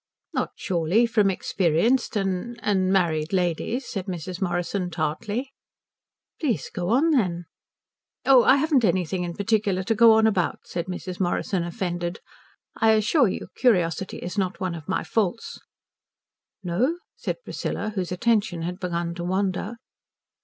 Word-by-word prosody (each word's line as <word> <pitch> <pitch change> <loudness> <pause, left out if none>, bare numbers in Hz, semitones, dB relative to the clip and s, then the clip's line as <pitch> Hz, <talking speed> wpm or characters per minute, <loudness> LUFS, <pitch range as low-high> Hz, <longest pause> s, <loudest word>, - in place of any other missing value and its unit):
"Not, - - -1
surely, 180 +5 +1
from 215 -4 +3
experienced 195 +7 +1
and 195 +4 -2
and 190 -2 +2
married 165 -5 +1
ladies," 190 +7 0
said 195 -2 -5
Mrs. 180 +1 -5
Morrison 180 +1 -1
tartly. 205 - -3 0.9
"Please 240 - -1
go 175 0 -3
on 280 +9 +3
then." 180 - +1 0.8
"Oh, 260 -3 +7
I 260 - +6
haven't 285 -3 +2
anything 180 -2 0
particular 200 -2 +1
to 225 - +1
go 225 +1 +7
on 220 0 +4
about," 195 -6 +1
said 170 0 -4
Mrs. 180 0 -6
Morrison, 185 0 0
offended. 175 0 -3 0.6
"I 220 0 +4
assure 225 +5 +3
you 185 - -4
curiosity 190 -6 +1
is 180 +4 -4
not 185 -1 -1
one 185 -2 -2
of 160 0 -9
my 190 - 0
faults." 225 0 -2 1.0
"No?" 235 - 0 0.2
said - - -3
Priscilla, 215 - -3
whose 185 -4 -3
attention 200 -3 +1
had 180 +2 -4
begun 170 -2 -2
to 175 0 -6
wander. 190 +4 -1
190 Hz, 140 wpm, -25 LUFS, 175-220 Hz, 1.0 s, Oh